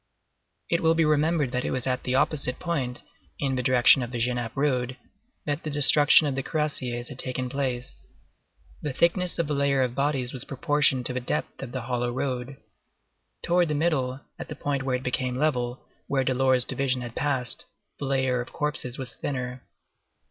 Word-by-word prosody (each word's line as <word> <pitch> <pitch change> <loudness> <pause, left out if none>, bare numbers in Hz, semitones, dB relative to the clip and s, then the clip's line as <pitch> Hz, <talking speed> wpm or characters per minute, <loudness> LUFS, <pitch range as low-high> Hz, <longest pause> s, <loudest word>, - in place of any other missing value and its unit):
It 170 - +2
will 165 0 +4
be 165 -1 +3
remembered 150 -2 +2
that 125 0 -1
it - - -1
was 130 - -2
at 130 -1 0
the 125 - -1
opposite 135 -2 +1
point, 140 -8 -2 0.3
in 135 -2 -1
the 130 - 0
direction 130 +1 +5
of 120 - -3
the 120 - -4
Genappe 120 0 -1
road, 130 -3 0 0.5
that 145 +2 -1
the 155 - -4
destruction 145 +1 +6
of 145 - 0
the 135 - -1
cuirassiers 130 -6 -2
had 135 -3 -9
taken 130 0 -1
place. 130 -3 -3 0.7
The 150 -3 -3
thickness 175 +5 +2
of 170 - +1
the 150 - -2
layer 140 -1 +2
of 125 -2 -1
bodies 135 -2 0
was 130 - -2
proportioned 135 -1 +1
to 125 - 0
the 130 - -1
depth 125 - -3
of 120 - -6
the 130 - -3
hollow 120 0 -1
road. 130 +1 -3 0.9
Towards 175 -1 +2
the 150 - 0
middle, 140 -5 0 0.2
at - - -6
the - - -5
point 140 -1 -2
where 135 -1 0
it 125 - -4
became 125 0 -1
level, 125 -4 -1 0.2
where 135 -1 +1
Delort's 130 -1 +3
division 130 -2 0
had 120 -1 -6
passed, 130 -4 -1 0.3
the - - -3
layer 130 -2 +1
of 120 - -8
corpses 145 -4 -3
was 130 -3 -6
thinner. 125 -2 -4
130 Hz, 190 wpm, -26 LUFS, 125-145 Hz, 0.9 s, destruction